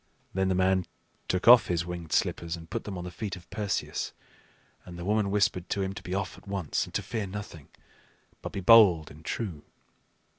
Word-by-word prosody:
Then 95 0 +1
the 95 - +1
man 95 0 +2 0.4
took 90 +3 -1
off 120 -1 +9
his 85 -1 0
winged 85 -3 -6
slippers, 85 0 0
and 80 -1 -11
put - - -3
them 100 -3 -5
on 90 - -5
the 90 - -6
feet 100 0 -5
of 90 -1 -14
Perseus; 105 -3 -2 0.7
and 90 -1 -10
the 85 - -6
woman 105 0 +1
whispered 100 -3 +1
to 100 - 0
him 95 0 -3
to - - -8
be 90 - -4
off 100 0 -3
at - - -22
once, 95 -5 -1
and - - -14
to - - 0
fear 110 -4 -3
nothing, 95 -7 -8 0.7
but - - -6
be 100 - -4
bold 95 -6 +6
and 75 +2 -14
true. 85 -4 -4
95 Hz, 210 wpm, -28 LUFS, 85-100 Hz, 0.7 s, off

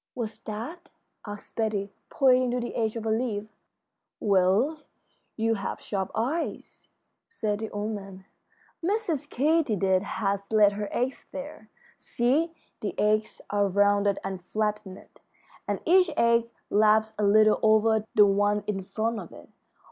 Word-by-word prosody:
"What's 225 -3 -5
that?" 245 - -7 0.4
asked 205 0 -9
Betty, 210 -3 -1 0.2
pointing 255 -2 +3
to 250 +1 -1
the 240 - -4
edge 220 -1 -1
of 225 -1 -5
a 220 - 0
leaf. 220 -2 -1 0.7
"Well, 200 +10 +2 0.6
you 225 0 +1
have 200 -3 -4
sharp 195 -2 -3
eyes," 270 +10 -3 0.4
said 215 - -2
the 220 0 -4
old 210 +1 -3
man. 195 -2 -8 0.6
"Mrs. 370 -6 -1
Katydid 235 - +2
has 200 0 -3
laid 210 -2 +5
her 205 0 -4
eggs 255 +2 -2
there. 275 -6 -8 0.3
See, 280 +8 0 0.3
the 210 - -4
eggs 215 +1 +1
are 205 0 +2
rounded 200 +1 +2
and 190 -2 -5
flattened, 210 -1 -3 0.6
and - - -1
each 365 0 +5
egg 235 0 +3 0.2
laps 215 +1 +4
a - - +1
little 215 +1 +5
over 220 0 +4
the 210 - +8
one 205 +1 +2
in 200 -2 -2
front 225 +4 -2
of 175 - -9
it. - - -14
215 Hz, 140 wpm, -27 LUFS, 205-235 Hz, 0.7 s, the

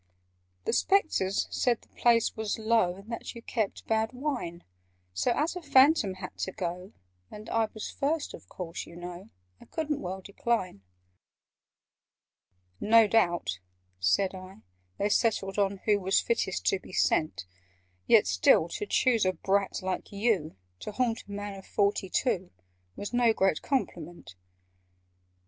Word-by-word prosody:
"The - - 0
Spectres 310 - +2
said 240 -3 +1
the - - -22
place 235 -2 +2
was 220 -2 -2
low, 220 -5 +2
And 200 +4 -12
that 230 - -6
you 230 - -9
kept 220 -5 -2
bad 220 +1 0
wine: 250 - -4 0.5
So, 90 +1 0
as 315 +4 0
a 360 - -5
Phantom 270 - +4
had 185 - -8
to 190 - -2
go, 180 0 -5 0.4
And 210 +1 -10
I 225 -1 +2
was 215 - -5
first, 295 +2 -1
of - - -12
course, 170 -2 -6
you 170 - -12
know, 175 +3 -8 0.3
I - - -15
couldn't 305 -2 -3
well 190 +1 -5
decline." 200 - -2 2.0
"No 225 +1 +6
doubt," 175 - +1 0.4
said 90 - +2
I, 185 +1 -11 0.3
"they 200 - +1
settled 200 -3 +1 0.3
who 210 -2 +3
Was 190 0 +2
fittest 210 -5 -1
to 195 - +2
be - - -14
sent 155 - +1 0.6
Yet - - +6
still 95 - +4
to 205 - -4
choose 235 0 +3
a 185 0 +2
brat 195 +3 0
like 185 0 -3
you, 200 - 0 0.2
To 210 - -6
haunt 235 0 -1
a - - -10
man 205 0 -5
of 190 - -15
forty 200 -2 +1
two, 190 -5 0 0.5
Was 205 - -6
no 240 -2 +4
great 190 -6 +1
compliment!" 175 - -3
205 Hz, 150 wpm, -29 LUFS, 185-230 Hz, 2.0 s, No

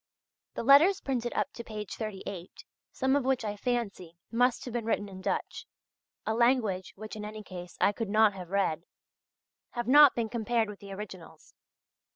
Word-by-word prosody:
The - - -3
letters 305 +10 +7
printed 245 -3 -2
up - - -1
to 235 - -7
page 210 -3 -6
38, 195 -4 -7 0.3
some 265 +1 +1
of 285 - +2
which 260 -3 0
I 205 -1 -2
fancy 205 -7 -3
must 245 +1 +2
have 245 - -6
been 235 -2 -2
written 205 -2 0
in 190 -1 -10
Dutch - - -3 0.6
a 220 - 0
language 225 -6 +1
which 215 +2 -8
in 210 - -6
any 215 0 -7
case 180 -2 -9
I - - +4
could 220 0 -4
not 215 0 +4
have 180 -3 -9
read 180 -4 0 0.9
have 240 -1 -3
not 290 +1 +8
been 230 -2 0
compared 225 0 0
with 205 - -9
the 200 -1 -10
originals. 185 -5 -10
215 Hz, 180 wpm, -29 LUFS, 195-240 Hz, 0.9 s, not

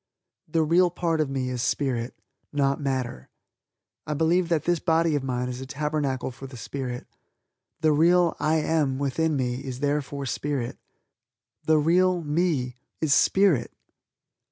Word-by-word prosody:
The 160 +1 +1
real 175 +3 +4
part 165 -2 0
of 150 - -1
me 130 -2 -2
is 125 -1 -3
Spirit, 125 -3 -1 0.3
not 140 -1 +1
matter. 130 - -3 0.8
I 150 - -1
believe 165 +3 +2
that 160 -4 +1
this 175 0 +1
body 165 -1 +2
of 145 -2 0
mine 125 -1 -2
is 125 0 -5
a 130 - -7
Tabernacle 145 -3 -2
for 135 +2 -10
the 130 -1 -11
Spirit. 125 0 -5 0.8
The 155 - +4
real 170 +3 +4
"I 155 +2 +2
am" 150 -4 +1
within 150 +3 0
me 125 0 -2
is 130 -2 -6
therefore 145 -1 -1
Spirit. 135 -2 -3 0.9
The 155 0 +4
real 175 +3 +3
"me" 145 -5 0 0.2
is 155 -3 +2
Spirit. 185 -11 +3
145 Hz, 150 wpm, -26 LUFS, 130-160 Hz, 0.9 s, real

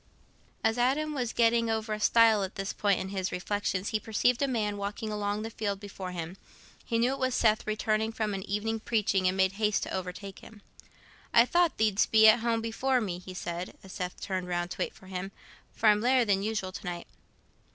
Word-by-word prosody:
As 225 +1 +1
Adam 290 +5 +1
was 250 -5 -2
getting 230 0 +3
over 220 -1 -1
a 215 - -3
stile 225 -1 +5
at 190 -1 -4
this 195 0 -3
point 200 -3 +1
in 190 - -4
his 190 -1 -2
reflections, 195 +1 -2
he 215 - 0
perceived 230 +4 +1
a 280 - +2
man 215 -5 -1
walking 205 +2 -4
along 210 0 -2
the 225 - -5
field 205 -3 -3
before 195 -2 -7
him. 175 +1 -6 0.5
He 230 - -1
knew 245 +3 +2
it 275 - -6
was 260 -1 0
Seth, 215 -1 +2
returning 215 +1 0
from 215 -2 -2
an 195 - -3
evening 220 +2 -1
preaching, 210 -4 +1
and 185 +1 0
made 190 0 +3
haste 210 +1 0
to - - -5
overtake 190 +1 -5
him. 210 -2 -15 0.7
"I 235 - +8
thought 345 +4 +2
thee'dst 215 -2 +2
be 220 0 +7
at 220 +2 +7
home 230 0 0
before 250 +3 0
me," 185 -6 -3
he 185 0 -10
said, 175 0 -5
as 190 - -11
Seth 180 -1 -5
turned 185 -2 -3
round 175 0 -2
to - - -7
wait - - -2
for - - -17
him, 190 +1 -5 0.4
"for 225 - 0
I'm 210 0 +5
later 250 +1 +3
than 200 -2 +2
usual 210 -3 -2
to - - -8
night." 175 -2 -5
210 Hz, 215 wpm, -29 LUFS, 190-225 Hz, 0.7 s, I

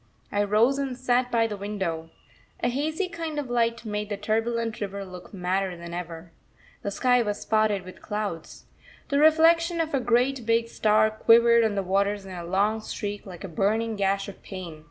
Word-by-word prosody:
I 205 0 +1
rose 225 +7 +3
and 270 -3 -3
sat 250 -1 +1
by 230 -1 +3
the 215 -2 -3
window. 190 -5 -4 0.5
A - - +2
hazy 310 +8 -1
kind 330 -3 -5
of 275 -4 -3
light 235 -1 0
made 210 -1 -3
the 205 - -3
turbulent 225 +2 -1
river 200 -1 -4
look 180 -1 -11
madder 185 -1 -1
than 170 0 -8
ever. 170 -1 -7 0.5
The 200 - -3
sky 250 +4 +3
was 210 -2 -2
spotted 215 -3 +1
with 185 - -11
clouds. 205 -6 -5 0.4
The 280 -1 +2
reflection 330 +2 +5
of 320 -2 -1
a 275 - +2
great 245 +2 +1
big 230 0 +1
star 215 -1 +3
quivered 235 +1 +5
on 220 -2 +1
the 195 - 0
waters 200 +2 0
in 190 - -8
a 175 -1 -6
long 200 +5 +1
streak, 205 -1 -5
like 180 -3 -9
a - - -4
burning 215 +6 0
gash 195 0 0
of 200 - -10
pain. 180 -5 -8
215 Hz, 190 wpm, -26 LUFS, 195-240 Hz, 0.5 s, reflection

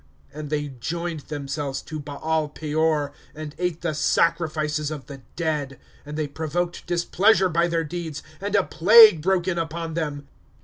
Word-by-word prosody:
^^ - - -32 0.3
And 150 -1 -6
they 145 -1 -1
joined 165 +6 -4
themselves 140 -2 -4
to 155 -1 -6
Baal 150 +2 -2
Peor, 150 -1 0 0.2
And 155 -1 -7
ate 180 -2 -1
the 170 -2 -1
sacrifices 155 -1 +1
of 150 -5 -6
the 135 0 -10
dead. 150 -5 -2 0.3
^' - - -30
And 150 +1 -6
they 155 -1 -1
provoked 160 +4 -3
displeasure 185 +3 +3
by 170 +1 +2
their 165 -1 0
deeds, 160 -1 -5 0.2
And 205 +1 -2
a 200 - +4
plague 210 -1 +7
broke 185 +1 +1
in 175 -2 0
upon 165 0 -4
them. 145 -3 -3
160 Hz, 170 wpm, -24 LUFS, 150-170 Hz, 0.3 s, plague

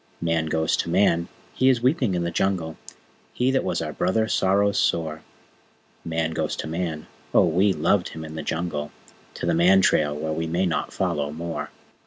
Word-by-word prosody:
Man 85 -1 0
goes 80 0 +1
to - - -2
Man! 85 -1 +2 0.3
He 130 - +3
is 120 -3 +2
weeping 125 - +2
in 85 - -1
the 85 - -2
Jungle: 85 -3 -1 0.6
He 125 +2 +2
that 135 - +1
was - - -1
our - - -5
Brother 110 -1 +1
sorrows 100 0 +2
sore! 80 -2 0 0.8
Man 80 -1 -1
goes - - -2
to - - -5
Man! 80 -1 -3 0.3
(Oh, - - +6
we 95 +5 +3
loved 90 +3 +1
him 80 0 -8
in 80 - -8
the 80 - -4
Jungle!) 75 -1 -3 0.4
To - - -4
the 85 - +2
Man 90 +4 +5
Trail 75 -5 +2
where 80 +1 -2
we 80 +1 -2
may 85 +4 0
not 85 - -1
follow 75 -1 -1
more. 85 +2 -5
85 Hz, 190 wpm, -24 LUFS, 80-95 Hz, 0.8 s, Oh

